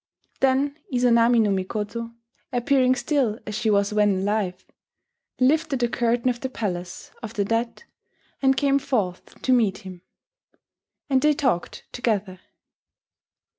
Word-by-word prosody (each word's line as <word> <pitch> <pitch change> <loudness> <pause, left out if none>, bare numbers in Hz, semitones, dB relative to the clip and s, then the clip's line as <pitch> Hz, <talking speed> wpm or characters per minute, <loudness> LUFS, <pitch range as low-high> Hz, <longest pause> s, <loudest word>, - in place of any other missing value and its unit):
Then 270 +2 +2
Izanami 240 -1 +4
no 210 -2 +2
Mikoto, 210 +4 -3 0.4
appearing 255 +1 +2
still 260 -7 0
as 210 - -5
she 220 +2 0
was 200 0 +2
when 205 -3 +2
alive, 195 -3 -2 0.7
lifted 300 +2 +2
the 240 -1 +1
curtain 235 +1 0
of 245 -1 0
the 260 - -4
palace 180 -7 -5
(of 225 -2 -7
the 200 - 0
dead), 230 - -2 0.6
and 265 0 +3
came 280 -1 +3
forth 205 -10 -3
to 260 - +3
meet 215 -4 +1
him; 185 -2 -9 1.1
and 265 -2 +2
they 300 0 +3
talked 250 -12 -1
together. 210 -6 -2
235 Hz, 130 wpm, -24 LUFS, 205-260 Hz, 1.1 s, Izanami